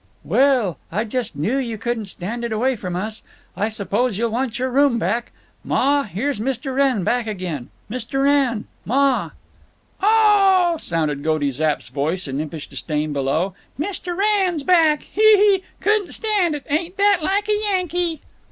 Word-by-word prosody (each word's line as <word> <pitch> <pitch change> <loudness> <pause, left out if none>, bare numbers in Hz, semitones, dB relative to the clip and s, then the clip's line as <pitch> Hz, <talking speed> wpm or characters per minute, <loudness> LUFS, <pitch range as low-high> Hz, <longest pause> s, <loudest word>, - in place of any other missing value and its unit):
"Well, 235 - +2
I 205 +6 0
just 235 0 -3
knew 210 - 0
you 235 -5 -2
couldn't 230 0 -2
stand 210 +6 -5
it 235 - -3
away 250 +4 +1
from 180 -5 -5
us. 215 +4 -4 0.3
I 210 - 0
suppose 215 +1 -1
you'll 230 +1 0
want 240 0 -2
your 260 0 -1
room 275 -2 +3
back. 230 +4 -1 0.3
Ma, 280 +1 +2
here's 230 +5 -2
Mr. 260 +3 -2
Wrenn 265 -7 +2
back 240 +4 0
again—Mr. 210 - -4
Wrenn! 275 -6 +2 0.2
Ma!" 270 +3 +2 0.7
"Oh 400 -4 +5
h - - -1
h - - -15
h!" - - -7
sounded 155 -4 -1
Goaty 155 -3 +1
Zapp's 150 +3 -1
voice, 160 +5 -2
in 135 +2 -2
impish 155 -1 -6
disdain, 150 -1 -3
below. 145 +7 0 0.3
"Mr. 355 +1 -3
Wrenn's 390 -6 +1
back. 320 -3 +4
Hee, 425 - -4 0.2
hee! 395 -2 +4 0.2
Couldn't 420 -3 +1
stand 405 -8 +1
it. 290 - -7
Ain't 335 +6 -2
that 400 -2 +4
like 395 +6 0
a 425 - +2
Yankee!" 355 -5 -1
250 Hz, 165 wpm, -21 LUFS, -, 0.7 s, Oh